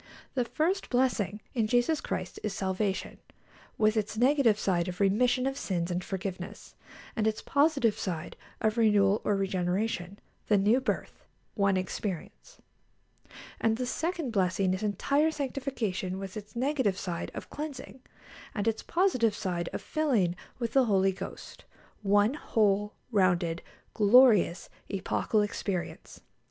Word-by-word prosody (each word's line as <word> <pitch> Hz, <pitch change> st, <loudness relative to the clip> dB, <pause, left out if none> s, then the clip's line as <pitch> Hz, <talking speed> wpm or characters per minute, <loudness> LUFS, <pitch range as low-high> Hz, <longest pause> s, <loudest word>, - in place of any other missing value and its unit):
The 250 Hz, -2 st, 0 dB
first 345 Hz, +10 st, -1 dB
blessing 220 Hz, -6 st, +1 dB
in 225 Hz, -4 st, +1 dB
Jesus 245 Hz, +7 st, +2 dB
Christ -, -, -4 dB
is 210 Hz, -2 st, -3 dB
salvation, 190 Hz, +1 st, -2 dB, 0.6 s
with 215 Hz, 0 st, +3 dB
its 215 Hz, 0 st, -1 dB
negative 250 Hz, -3 st, +4 dB
side 175 Hz, -5 st, 0 dB
of 180 Hz, 0 st, -5 dB
remission 245 Hz, +6 st, +3 dB
of 270 Hz, +1 st, -2 dB
sins 175 Hz, -2 st, -2 dB
and 180 Hz, +1 st, -2 dB
forgiveness, 185 Hz, -1 st, -6 dB, 0.4 s
and 220 Hz, -2 st, +1 dB
its 220 Hz, 0 st, -1 dB
positive 280 Hz, -6 st, +2 dB
side 170 Hz, -4 st, -4 dB, 0.3 s
of 220 Hz, +2 st, +1 dB
renewal 205 Hz, -2 st, +4 dB
or 205 Hz, -, +1 dB
regeneration 190 Hz, 0 st, -1 dB, 0.3 s
the 210 Hz, -, +4 dB
new 215 Hz, +6 st, +3 dB
birth 260 Hz, -, -3 dB, 0.3 s
one 200 Hz, -2 st, +2 dB
experience. 190 Hz, -, -5 dB, 1.0 s
And 225 Hz, 0 st, +2 dB
the 250 Hz, -, -2 dB
second 325 Hz, 0 st, -2 dB
blessing 185 Hz, -2 st, +1 dB
is 185 Hz, -, -3 dB
entire 280 Hz, -, +1 dB
sanctification, 255 Hz, -, -3 dB
with 195 Hz, -1 st, -7 dB
its 210 Hz, +1 st, -9 dB
negative 255 Hz, -6 st, +1 dB
side 175 Hz, -3 st, -4 dB
of -, -, -8 dB
cleansing, 285 Hz, -3 st, -7 dB, 0.5 s
and 210 Hz, 0 st, -1 dB
its 225 Hz, -1 st, 0 dB
positive 255 Hz, -, +2 dB
side 180 Hz, -5 st, -2 dB
of -, -, -5 dB
filling 235 Hz, -, +1 dB, 0.2 s
with 235 Hz, -2 st, -3 dB
the 270 Hz, -2 st, +5 dB
Holy 195 Hz, -3 st, +3 dB
Ghost 190 Hz, -, -9 dB, 0.4 s
one 205 Hz, +3 st, +3 dB
whole, 210 Hz, -7 st, +1 dB, 0.2 s
rounded, 175 Hz, -5 st, +2 dB, 0.3 s
glorious, 215 Hz, -4 st, +5 dB, 0.2 s
epochal 200 Hz, +2 st, 0 dB
experience. 195 Hz, -3 st, -4 dB
210 Hz, 135 wpm, -29 LUFS, 190-250 Hz, 1.0 s, the